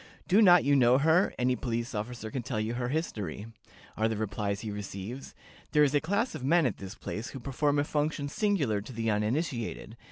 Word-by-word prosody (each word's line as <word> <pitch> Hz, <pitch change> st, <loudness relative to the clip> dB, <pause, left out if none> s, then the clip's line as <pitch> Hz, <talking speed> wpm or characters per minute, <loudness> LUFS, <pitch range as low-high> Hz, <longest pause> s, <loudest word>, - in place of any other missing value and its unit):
'Do 200 Hz, +4 st, +5 dB
not 180 Hz, -5 st, +7 dB
you 140 Hz, +1 st, +3 dB
know 125 Hz, -1 st, +5 dB
her? 160 Hz, +7 st, +3 dB
Any 125 Hz, +1 st, +2 dB
police 120 Hz, -1 st, -3 dB
officer 110 Hz, +1 st, -5 dB
can 130 Hz, -, -3 dB
tell 120 Hz, -2 st, -3 dB
you 110 Hz, +2 st, -2 dB
her 120 Hz, 0 st, -2 dB
history,' 105 Hz, -, -3 dB, 0.5 s
are 110 Hz, -, +1 dB
the 110 Hz, -1 st, -2 dB
replies 100 Hz, -1 st, -2 dB
he 110 Hz, -, -4 dB
receives. 105 Hz, +5 st, -7 dB, 0.4 s
There 150 Hz, -1 st, +6 dB
is 145 Hz, -1 st, +2 dB
a 145 Hz, -, +3 dB
class 200 Hz, +9 st, 0 dB
of 155 Hz, -5 st, -6 dB
men 165 Hz, +4 st, +4 dB
at 120 Hz, -, -1 dB
this 95 Hz, 0 st, -8 dB
place 110 Hz, +4 st, -5 dB
who 135 Hz, -, -7 dB
perform 140 Hz, +3 st, 0 dB
a 145 Hz, -, +3 dB
function 150 Hz, -1 st, -1 dB
singular 145 Hz, -, 0 dB
to 110 Hz, +5 st, -10 dB
the 115 Hz, -1 st, -1 dB
uninitiated. 115 Hz, 0 st, -2 dB
125 Hz, 210 wpm, -29 LUFS, 110-150 Hz, 0.5 s, not